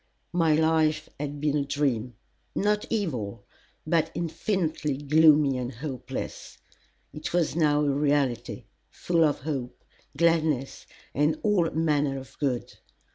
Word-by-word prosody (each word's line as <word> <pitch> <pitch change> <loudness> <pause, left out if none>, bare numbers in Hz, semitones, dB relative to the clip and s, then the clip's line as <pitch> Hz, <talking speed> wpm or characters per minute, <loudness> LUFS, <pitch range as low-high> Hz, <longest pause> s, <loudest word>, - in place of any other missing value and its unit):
My 165 -3 +3
life 155 -1 +2
had 145 0 -4
been 150 0 0
a 145 - +1
dream, 130 -5 -1 0.4
not 210 +1 +1
evil, 120 - -3 0.4
but 160 0 +2
infinitely 165 -4 -1
gloomy 150 -2 +4
and 125 0 -3
hopeless. 130 0 -6 0.6
It 150 +2 -6
was 170 -4 +1
now 150 -2 +3
a 145 - +2
reality, 140 -4 0 0.3
full 170 -2 +1
of 150 -2 +1
hope, 135 -4 -5 0.3
gladness, 160 -5 +1 0.3
and 150 +3 +1
all 195 -6 +3
manner 150 -4 +1
of 130 -1 -10
good. 130 -5 -1
150 Hz, 125 wpm, -27 LUFS, 135-160 Hz, 0.6 s, gloomy